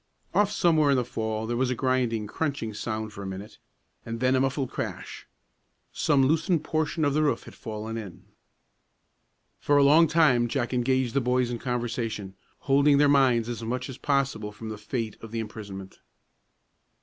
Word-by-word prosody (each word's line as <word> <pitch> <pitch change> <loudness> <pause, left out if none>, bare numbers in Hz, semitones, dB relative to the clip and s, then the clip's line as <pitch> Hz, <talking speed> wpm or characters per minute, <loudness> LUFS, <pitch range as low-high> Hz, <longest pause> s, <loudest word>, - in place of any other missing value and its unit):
Off 205 0 +3
somewhere 160 -7 +3
in 140 - +4
the 125 - 0
fall 110 -1 -3
there 120 +1 -2
was 125 +1 +1
a 125 - 0
grinding, 125 -4 0
crunching 135 -2 -3
sound 110 0 -4
for 100 - -8
a 100 - -5
minute, 95 +2 -8 0.4
and 115 0 -5
then 130 +1 +3
a - - +3
muffled 135 0 -1
crash. - - -6 0.7
Some 145 -3 +3
loosened 160 +3 +1
portion 155 0 0
of 145 - +1
the 155 - +2
roof 150 -2 +1
had - - -12
fallen 110 +1 -6
in. 100 -6 -8 1.4
For 145 - +2
a 140 - +6
long 155 +4 +6
time 140 -8 +4
Jack 120 0 -2
engaged 125 0 +1
the 140 - +2
boys 125 0 +1
in 120 - -4
conversation, 115 -5 -3 0.3
holding 140 +1 +4
their 145 +1 +5
minds 130 -5 +4
as 120 -1 -4
much 125 +3 -3
as 130 - -8
possible 135 -7 0
from 110 +1 -8
the 110 - -5
fate 110 0 -4
of 115 0 -9
imprisonment. 100 -4 -7
125 Hz, 175 wpm, -27 LUFS, 110-140 Hz, 1.4 s, a